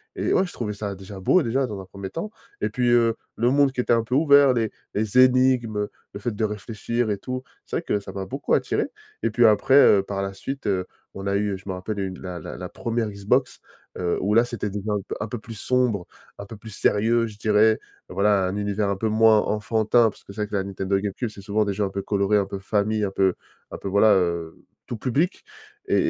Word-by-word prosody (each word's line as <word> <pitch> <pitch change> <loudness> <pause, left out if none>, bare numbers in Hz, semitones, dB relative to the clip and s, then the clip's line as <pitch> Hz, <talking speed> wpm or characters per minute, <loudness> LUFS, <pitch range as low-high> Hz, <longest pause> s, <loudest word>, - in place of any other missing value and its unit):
et - - -4
et, - - +3
ouais, 190 - +3
je - - -9
trouvais 105 -3 -3
ça, 100 -1 -5
déjà, 95 +1 -10
beau, 165 - +3
déjà, 130 +3 0
dans 105 -3 -6
un - - -10
1er 95 +1 -8
temps 210 - -5 0.3
et - - 0
puis, 125 -1 0
heu, 115 -1 +4 0.2
le 120 +2 +2
monde 140 -1 +4
qui 125 - 0
était 120 - +2
un 115 -1 +2
peu 125 +3 -2
ouvert, 140 -3 +6
les 115 -3 0 0.2
les 110 +3 -1
énigmes, 130 -4 +4
heu, 105 0 -1 0.2
le 100 - -6
fait 120 +3 -2
de 110 - -2
réfléchir 110 +2 -3
et 100 - -1
tout, 130 +5 -5 0.2
c'est - - -5
vrai - - -2
que 105 - 0
ça 100 - -9
m'a 95 -1 -4
beaucoup - - -3
attiré. - - +1 0.4
Et 115 - +2
puis 120 +1 +4
après, 110 +5 +4
heu, 105 -8 +7
par 100 0 -4
la 100 0 -4
suite, 135 +8 -6
heu, 95 -2 0 0.3
on 100 0 -6
a 100 - +1
eu, 100 -1 0
je 95 - -17
me - - -1
rappelle, 100 +3 -4
une 95 -1 -4
la 90 -2 -6
la - - -8
la - - -6
1re 115 -2 -2
Xbox, 105 +6 0 0.4
heu, 90 -1 0
où, 105 +3 +1
là, 115 +2 +6
c'était 110 -4 -4
des 100 0 -4
jeux 105 +1 -3
un 100 - -1
p - - -4
un 105 - -3
peu 120 - -5
plus 115 +2 -10
sombres, 120 -5 0 0.3
un 100 - -6
peu 115 - -9
plus 110 +2 -11
sérieux, 115 +4 +2
je 105 -2 -11
dirais. 110 +1 +3 0.3
Voilà, 100 0 +2
un 95 - -3
univers 105 0 -1
un 100 - -1
peu 110 +2 -1
moins 110 0 +5
enfantin, 110 +2 +2
parce - - -15
que - - -12
c'est 105 - -5
vrai 105 - -1
que - - -5
la 95 - +1
Nintendo 95 0 -1
Game 100 -1 -3
Cube, 120 -3 -3
c'est 100 - -12
souvent 105 +1 0
des 100 - -1
jeux 105 - -1
un 100 - 0
peu 100 0 -4
colorés, 100 +1 +1
un 100 - +1
peu 100 - -6
famille, 105 +1 0
un 100 - -1
peu 95 -1 +2 0.4
un - - -6
peu - - -7
voilà, 100 +2 +5
heu, 85 -3 -1 0.3
tout 120 - -4
public. 140 - -1 0.5
Et - - +3
105 Hz, 260 wpm, -24 LUFS, 100-115 Hz, 0.5 s, heu